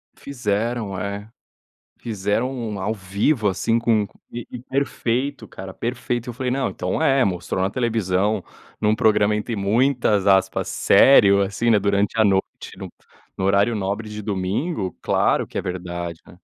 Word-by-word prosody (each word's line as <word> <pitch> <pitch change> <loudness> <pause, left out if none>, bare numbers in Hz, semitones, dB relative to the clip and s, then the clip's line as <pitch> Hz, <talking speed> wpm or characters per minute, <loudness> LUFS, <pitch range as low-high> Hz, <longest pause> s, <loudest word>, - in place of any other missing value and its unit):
Fizeram, 115 -4 -2
é. 100 +2 -5 0.7
Fizeram 105 +2 -1
um 115 -6 -4
ao 100 +3 -1
vivo, 105 +4 0
assim, 115 +4 0
com 115 -3 +2
c - - -17 0.2
e 120 -1 -7
e 125 - -6
perfeito 130 0 -2
cara, 95 0 -9
perfeito. 120 +1 -3
Eu - - -5
falei: 125 +2 -3
"Não, 135 +1 0
então - - -3
é, 135 -4 +3
mostrou 90 -1 -2
na 95 - +1
televisão, 105 -3 0 0.4
num 105 0 +2
programa 105 -1 +3
entre 105 +2 -3
muitas, 110 0 +2
aspas, 95 -1 +2
'sério', 100 -7 +6
assim, 100 +4 0
né, 110 - +5
durante 100 +2 0
a 110 - +5
noite, 95 -2 +3 0.3
no - - -7
p - - -32 0.3
no 95 - -1
horário 100 +4 +3
nobre 105 +2 -3
de 105 0 -6
domingo, 100 - -2
claro - - +2
que - - -8
é - - 0
verdade, 85 -2 -5
né". - - -17
105 Hz, 165 wpm, -22 LUFS, 100-120 Hz, 0.7 s, sério